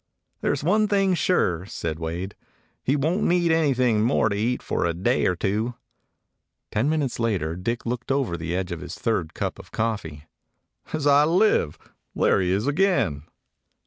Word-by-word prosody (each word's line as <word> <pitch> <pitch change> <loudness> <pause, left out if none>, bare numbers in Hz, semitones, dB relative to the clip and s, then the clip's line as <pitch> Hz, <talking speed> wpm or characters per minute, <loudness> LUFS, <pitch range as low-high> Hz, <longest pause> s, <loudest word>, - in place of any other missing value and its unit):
"There - - +1
's - - -6
one 210 +6 +3
thing 195 -2 +2
sure," 95 - +1
said 80 -5 -4
Wade. 85 +4 -4 0.5
"He 135 - +2
won't 160 +8 0
need 175 -3 +2
anything 130 -8 +2
more 115 -1 +2
to 100 - -1
eat 120 +5 -1
for - - -1
a 85 -1 0
day 120 +9 +1
or 90 - +1
two." 105 +7 -1 1.0
Ten 120 +8 +1
minutes 150 -7 -1
later 95 -9 0
Dick 115 +7 -3
looked 120 +1 -3
over 135 -10 0
the 85 +1 -3
edge 95 0 -2
of 85 -3 -4
his - - -7
third 90 -9 -2
cup - - -3
of - - -12
coffee. 100 -10 -3 0.7
"As 155 -2 -2
I 145 +1 +6
live, 175 - +2 0.4
he's - - -1 0.4
there - - -2
again!" 145 - +1
115 Hz, 170 wpm, -24 LUFS, 90-150 Hz, 1.0 s, I